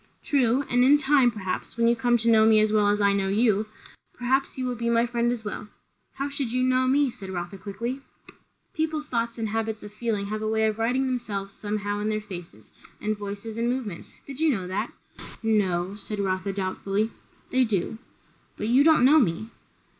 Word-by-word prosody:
"True; 265 -1 +2
and 245 0 +3
in 280 +3 +7
time, 275 -3 +4
perhaps, 200 -1 -5
when 230 0 +3
you 235 - +4
come 240 0 +2
to 230 0 -2
know 220 -1 +6
me 220 0 +6
as 215 0 +2
well 210 -1 +4
as 205 0 +2
I 200 -1 +4
know 195 -1 0
you, 215 +1 +2 0.5
perhaps 265 +3 0
you 260 - -2
will 250 - -1
be 235 0 -2
my 235 0 +3
friend 240 0 0
as 230 -3 -4
well." 210 0 -5 0.5
"How 275 +1 -3
should 280 -4 -3
you 255 +1 +1
know 255 0 +3
me?" 275 0 +3
said 195 -4 -10
Rotha 180 +1 -5
quickly. 235 +7 -4 0.7
"People's 315 -1 -2
thoughts 230 -2 -2
and 225 -2 -2
habits 220 0 -2
of 210 0 -10
feeling 215 -2 -2
have 215 +1 -4
a 215 - -2
way 220 0 +2
of 215 0 -1
writing 250 +4 +1
themselves 210 -6 -3
somehow 205 -1 -3
in 210 +1 -1
their 215 0 0
faces, 185 -5 -10 0.3
and 215 0 -1
voices, 205 +2 -6
and 235 +1 0
movements. 240 -9 -4
Did 275 0 -7
you 320 0 +3
know 195 -10 0
that?" 185 +3 -3 0.5
"No 195 -4 +1
" - - -12
Rotha 190 -2 -1
said 195 -1 -2
doubtfully. 200 +3 -1 0.4
"They 260 0 +4
do." 220 -1 -1 0.6
"But 210 - -2
you 260 +4 +5
don't 315 -5 +5
know 300 +4 +7
me." 215 - 0
220 Hz, 205 wpm, -26 LUFS, 205-250 Hz, 0.7 s, in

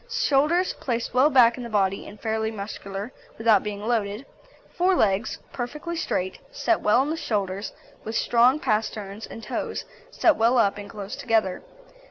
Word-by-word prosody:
SHOULDERS 335 - +2
Placed 235 -2 -2
well 260 +4 +5
back 245 -4 +5
in 250 - -6
the 235 - -6
body, 195 -2 0
and 210 - -11
fairly 220 -1 -1
muscular, 200 0 -6 0.3
without 220 -3 +4
being 205 -1 -5
loaded. 220 0 -1 0.5
FORE 365 +1 +3
LEGS 210 - +1 0.2
Perfectly 300 +7 -4
straight, 190 - -2
set 425 -9 0
well 225 +5 +4
into 295 - -2
the - - -4
shoulders, 200 -2 -2 0.3
with 220 +1 -5
strong 245 +6 +4
pasterns 215 -4 -2
and 225 - -10
toes - - -4 0.2
set 330 - +3
well 230 +3 +3
up 205 -3 +2
and 205 - -8
close 205 -2 -6
together. 220 -6 0
225 Hz, 165 wpm, -25 LUFS, 205-260 Hz, 0.5 s, well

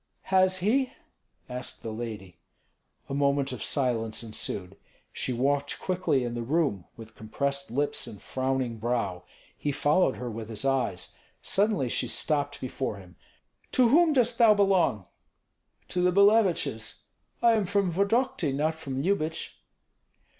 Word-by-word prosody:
"Has 185 0 +4
he?" 255 +4 +2 0.5
asked 125 0 -7
the 110 - -4
lady. 105 -7 -7 0.7
A - - -5
moment 140 -1 +1
of 125 -5 -6
silence 115 -5 -1
ensued. 100 -4 -5 0.4
She - - -1
walked 140 +3 0
quickly 175 -8 0
in 120 -1 -3
the 120 - -3
room, 135 - 0
with 115 -1 -11
compressed 140 +6 -3
lips 145 +5 -2
and 105 - -9
frowning 130 -3 -2
brow. 105 -6 -2 0.3
He 145 - -2
followed 145 +1 +2
her 125 - -5
with 110 -1 -6
his 110 +2 -3
eyes. 120 -9 -1 0.3
Suddenly 200 - +1
she - - 0
stopped 145 -2 -1
before 130 -3 -3
him. 95 -2 -14 0.6
"To 250 -2 +5
whom 325 +5 +5
dost 245 -3 +2
thou 225 -3 +7
belong?" 190 - +2 0.8
"To 180 - -1
the 180 0 +4
Billeviches. 200 - +3 0.4
I 235 - +7
am 215 -4 +1
from 200 -2 +1
Vodokty, 200 - +1
not 155 +3 +1
from 140 -4 -5
Lyubich." 165 -4 -2
140 Hz, 140 wpm, -28 LUFS, 115-185 Hz, 0.8 s, thou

